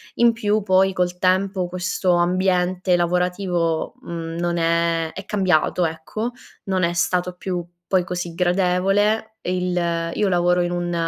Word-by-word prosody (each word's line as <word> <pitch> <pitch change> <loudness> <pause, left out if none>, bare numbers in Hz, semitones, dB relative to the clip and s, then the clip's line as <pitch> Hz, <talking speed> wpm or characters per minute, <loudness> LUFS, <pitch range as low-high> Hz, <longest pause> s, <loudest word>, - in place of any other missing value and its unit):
In 235 0 +5
più 215 -1 0
poi 190 0 +3
col 180 -1 -1
tempo, 185 0 +1
questo 180 0 0
ambiente 180 +1 +1
lavorativo 175 -1 0
mhmm, 165 -1 -6
non 175 0 -1
è 165 -1 +1
è 195 - -8
cambiato 180 -3 +1
ecco, 165 +9 -4 0.3
non 190 -2 0
è 170 0 +1
stato 180 +1 0
più 180 -1 -4 0.2
poi 185 -2 +2
così 175 -2 -4
gradevole. 190 +4 +2 0.2
E 180 +1 -1
il 170 -2 -1
io 205 -2 +1
lavoro 180 0 +2
in 175 - 0
un 175 0 -2
180 Hz, 145 wpm, -22 LUFS, 175-190 Hz, 0.3 s, In